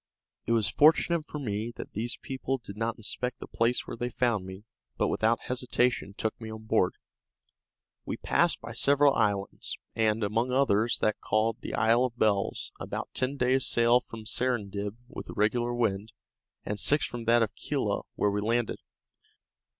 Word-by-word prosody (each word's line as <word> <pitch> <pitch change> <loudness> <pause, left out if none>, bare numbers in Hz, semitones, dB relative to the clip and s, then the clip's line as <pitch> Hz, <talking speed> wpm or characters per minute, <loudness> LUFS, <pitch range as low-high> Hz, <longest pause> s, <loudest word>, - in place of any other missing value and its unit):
It 115 - +2
was 110 -3 +2
fortunate 160 +1 +4
for - - -6
me 110 -4 -3
that - - -8
these 115 +4 -3
people 135 0 -2
did 105 -5 -10
not 115 +1 -2
inspect 125 +3 -3
the - - -7
place 115 +2 0
where - - -6
they 120 +1 -3
found 115 -6 0
me, 95 +2 -9 0.3
but - - +1
without 115 +1 +1
hesitation 125 -4 0
took 110 +1 -2
me 110 - -6
on 110 0 -8
board. 110 -4 +1 1.1
We - - -4
passed - - +2
by - - -7
several 140 0 +4
islands, 100 -2 0 0.2
and, 110 0 +1
among 115 +5 0
others, 120 -4 +2
that 110 - +1
called 110 +1 +1
the - - -4
Isle 115 +3 +4
of 120 -1 -5
Bells, 105 -3 +1
about - - -5
ten 130 +2 -1
days' 130 +1 +2
sail 120 +1 +4
from 115 -3 -10
Serendib 105 -4 -2
with - - -9
a - - -6
regular 120 +3 +1
wind, 110 -3 -1 0.5
and 105 0 -3
six 145 +6 +4
from 120 -2 -6
that 115 0 +5
of 105 - -3
Kela, - - -1
where 105 - +1
we 105 +1 -1
landed. 115 +2 0
115 Hz, 175 wpm, -29 LUFS, 105-125 Hz, 1.1 s, that